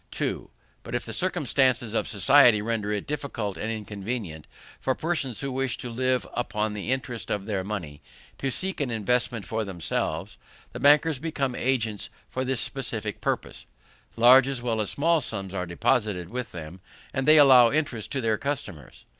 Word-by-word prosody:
2. - - -3 0.3
But - - -6
if - - -2
the - - -6
circumstances 130 - +1
of - - 0
society 115 +3 +6
render 105 -1 -2
it 105 -2 -2
difficult 130 -9 -4
and 110 - -4
inconvenient 105 -6 -5 0.3
for 130 - 0
persons 150 -8 -2
who 140 -1 -3
wish 130 -2 -1
to 120 - -6
live 130 +1 0
upon 110 -3 -2
the 105 +3 -4
interest 125 -3 -3
of 100 -1 -2
their 100 -3 -2
money, 85 -8 -5 0.4
to 135 - -1
seek 185 +5 -3
an 140 - -1
investment 115 -1 0
for 110 +5 -2
themselves, 90 -1 -3 0.3
the - - -7
bankers 150 0 +4
become 140 -4 -2
agents 115 -6 -1 0.2
for 130 - -2
this 130 -2 -1
specific 110 -6 -4
purpose: - - -3 0.5
large 125 +3 +7
as 135 -2 -2
well 115 -2 -1
as 105 - -2
small 165 +2 +2
sums 100 -6 -4
are 90 -2 -3
deposited 95 -1 0
with 125 0 -4
them, 85 +1 -8 0.3
and 135 0 -1
they 155 +1 +8
allow 130 -5 +8
interest 135 -6 -2
to 135 - -1
their 110 -2 0
customers. 125 - -5
120 Hz, 170 wpm, -26 LUFS, 105-135 Hz, 0.5 s, they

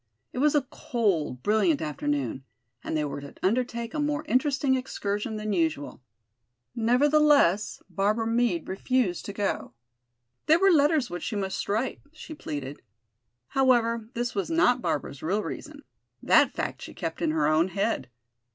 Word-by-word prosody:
It - - -4
was 300 +2 +3
a 285 -3 +2
cold, 180 - -1
brilliant 220 +9 +3
afternoon, 145 -3 -2 0.4
and 160 - -2
they 150 - 0
were 140 0 -5
to 140 - -11
undertake 235 +2 0
a 305 - -2
more 295 +1 -1
interesting 275 0 +2
excursion 220 -3 -2
than 215 -1 -2
usual. 160 -6 -1 0.7
Nevertheless, 260 - +3
Barbara 210 +3 0
Meade 230 -7 +1
refused 195 -1 0
to 200 - -5
go. 200 - -2 0.7
There 315 - +6
were 390 +2 +5
letters 295 -4 +3
which 175 - -4
she 220 - -3
must 195 -1 -3
write, 225 +6 -1
she 315 0 -9
pleaded. 145 - -6 0.7
However, 235 -4 +2
this 240 0 -2
was 200 +6 -2
not 325 -7 +3
Barbara's 145 - -3
real 200 +6 0
reason: 295 -1 -7 0.4
that - - +5
fact - - -3
she - - -9
kept - - -5
in 325 - +1
her 310 0 +1
own 155 +3 +3
head. 200 - -1
225 Hz, 150 wpm, -27 LUFS, 180-270 Hz, 0.7 s, There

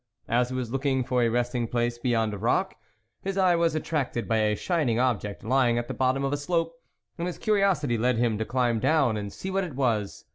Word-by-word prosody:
As 120 +1 +1
he 130 - -4
was 125 -3 -3
looking 135 -1 0
for 125 0 0
a 120 - +3
resting 120 0 -1
place 120 0 -1
behind 115 -3 0
a - - -4
rock, 185 - +1 0.5
his 195 0 -3
eye 185 -2 +4
was 170 -1 +1
attracted 145 -6 -2
by 115 - +1
a 105 -1 +2
shining 145 - 0
object 110 -5 -1
lying 120 0 +2
at 120 0 -2
the - - -4
bottom 130 +1 +1
of 135 +1 0
a - - 0
slope, 165 +3 -1 0.5
and 170 - -1
his 180 - -5
curiosity 190 - +1
led 125 +1 +2
him 115 -3 +1
to - - +1
climb 120 -2 +1
down 135 -3 +2
and 100 -1 -4
see 190 - -6
what 195 +1 0
it 165 -7 -6
was. 115 -7 -1
125 Hz, 225 wpm, -26 LUFS, 115-155 Hz, 0.5 s, eye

